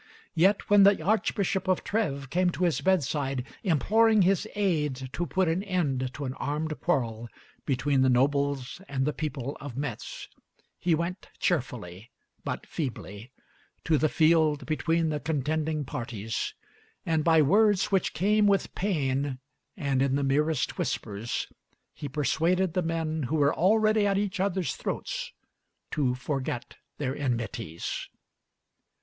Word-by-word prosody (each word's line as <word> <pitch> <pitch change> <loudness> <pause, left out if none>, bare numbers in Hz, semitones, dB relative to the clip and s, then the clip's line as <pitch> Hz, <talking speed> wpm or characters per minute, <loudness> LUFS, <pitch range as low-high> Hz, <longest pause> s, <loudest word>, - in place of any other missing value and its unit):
Yet 190 +4 +3
when 205 0 +6
the 200 0 +6
archbishop 195 -1 0
of 185 -1 +1
Trèves 140 -11 -1
came 180 +1 +3
to 185 - -2
his 170 -3 +1
bedside, 145 -7 0 0.2
imploring 215 - +4
his 195 +3 +2
aid 150 -10 0
to 175 - -2
put 185 +5 +1
an 165 +3 +1
end 145 -10 -1
to 145 - -4
an 130 - -3
armed 155 +1 -3
quarrel 120 -8 -1 0.4
between 135 +1 +2
the 130 - +4
nobles 140 +3 +1
and 135 -1 0
the 150 - 0
people 140 -3 -4
of 135 -3 -7
Metz, 140 -6 -5 0.5
he 175 -2 +2
went 170 +4 -4
cheerfully 120 - -2 0.3
but - - -4
feebly 115 - -5 0.5
to 155 -3 +2
the 155 - +2
field 155 -2 +3
between 165 +1 +1
the 150 -1 -1
contending 155 0 -1
parties, 115 -3 -4 0.5
and 160 -2 +1
by 160 -1 +5
words 205 +5 +3
which 195 -3 +1
came 210 +3 +3
with 200 -1 +1
pain 140 -8 -1 0.4
and 140 -6 0
in 135 0 +2
the 140 - 0
merest 145 0 +1
whispers, 105 +3 -2 0.5
he 145 - -6
persuaded 165 +5 +1
the 180 - +1
men 160 -1 -2
who 160 - 0
were 145 -2 +3
already 215 +3 +3
at 195 -1 +2
each 200 -2 -1
other's 190 -2 0
throats - - -4 0.6
to 130 -5 +1
forget 130 -2 -4 0.2
their 135 -2 -2
enmities. 115 - -3
155 Hz, 140 wpm, -28 LUFS, 135-185 Hz, 0.6 s, when